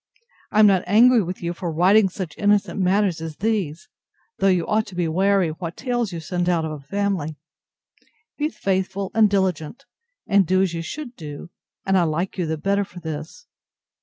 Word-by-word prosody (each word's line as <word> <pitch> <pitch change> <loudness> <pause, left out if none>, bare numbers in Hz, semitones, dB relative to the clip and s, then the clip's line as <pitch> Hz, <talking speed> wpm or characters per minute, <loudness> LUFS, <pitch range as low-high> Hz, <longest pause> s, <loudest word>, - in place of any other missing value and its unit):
I 215 - +1
am 215 - +8
not 195 -3 +4
angry 235 +4 +6
with 180 -1 -5
you 170 0 -2
for 175 -1 -4
writing 190 +5 +4
such 180 -4 -6
innocent 205 -1 +1
matters 190 -2 +1
as 160 -1 -6
these: 195 -7 -2 0.5
though 195 - +3
you 180 -3 +2
ought 220 +1 0
to 190 - -10
be 175 -2 0
wary 190 +1 +2
what 165 +1 -6
tales 240 -4 -1
you 170 - -5
send 175 +2 -2
out 165 -2 +1
of 160 - -4
a 155 - -6
family.—Be 195 - -6
faithful 195 -3 -2
and 220 -1 +5
diligent; 190 -2 -1 0.4
and 200 -3 +3
do 185 +1 +3
as 185 -3 -1
you 165 - -3
should 255 - -7
do, 150 +1 -9 0.3
and 190 -1 +3
I - - +3
like 165 +4 -2
you 175 - 0
the 160 0 -2
better 200 +5 0
for 180 -2 -11
this. 160 - -7
185 Hz, 190 wpm, -22 LUFS, 165-205 Hz, 0.5 s, am